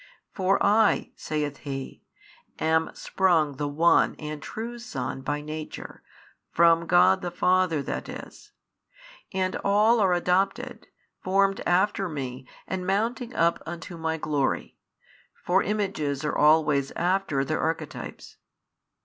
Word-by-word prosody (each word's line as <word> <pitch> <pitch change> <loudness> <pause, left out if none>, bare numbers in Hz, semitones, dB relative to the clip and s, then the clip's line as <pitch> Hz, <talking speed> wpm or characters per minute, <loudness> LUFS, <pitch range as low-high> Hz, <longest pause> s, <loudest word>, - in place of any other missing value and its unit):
For 190 0 +2
I 210 +1 +3
(saith 150 -2 -3
He) 135 -2 -6 0.6
am 160 0 +1
sprung 160 -7 +1
the 145 - -2
One 160 +4 +3
and 150 -1 -7
True 230 +8 -6
Son 135 - -5
by 145 +2 -2
Nature, 155 +1 -7 0.5
from 170 0 +4
God 190 +2 +5
the 180 - -3
Father 180 -3 +1
that - - -5
is; - - -10 0.8
and 185 0 -1
all 215 +4 +3
are 190 -3 +3
adopted, 180 +2 0 0.4
formed 195 +1 +2
after 190 +1 +2
Me 130 -4 -6 0.2
and 185 -1 -4
mounting 230 +5 -1
up 170 0 +2
unto 170 +1 -7
My 160 -1 -2
Glory, 145 -3 -1 0.6
for 185 +2 +1
images 155 -9 -2
are 150 - -1
always 150 -2 +4
after 175 -6 0
their 155 +2 -1
archetypes. 160 +1 -5
170 Hz, 125 wpm, -26 LUFS, 150-190 Hz, 0.8 s, God